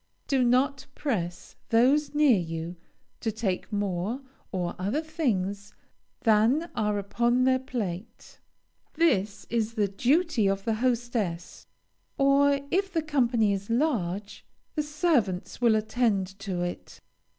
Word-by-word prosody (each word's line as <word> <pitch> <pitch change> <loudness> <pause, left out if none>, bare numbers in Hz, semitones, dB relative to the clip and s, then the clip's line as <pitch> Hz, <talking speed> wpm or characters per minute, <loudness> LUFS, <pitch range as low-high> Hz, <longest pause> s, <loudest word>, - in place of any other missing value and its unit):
Do 270 -3 +2
not 265 +3 +2
press 180 - -3
those 275 +6 +3
near 290 -8 +5
you 165 0 -5 0.4
to 225 - -1
take 210 -2 -3
more 205 +4 -2 0.3
or 175 -2 -2
other 210 +12 -1
things 205 - -2 0.5
than 235 +9 +3
are 210 -1 0
upon 240 +5 +1
their 260 0 +3
plate. 225 -5 -6 0.6
This 210 - +1
is 230 -1 -1
the 210 -3 +2
duty 250 - +2
of 195 0 -1
the 225 - +1
hostess, 235 -9 -2 0.5
or, 280 0 +4
if 385 +1 +1
the 325 -3 0
company 240 -8 +2
is 200 +1 -5
large, 210 - -1 0.3
the 305 - 0
servants 295 - 0
will 235 -2 +5
attend 215 -2 +1
to 190 -3 -3
it. 175 0 -6
230 Hz, 125 wpm, -27 LUFS, 195-275 Hz, 0.6 s, near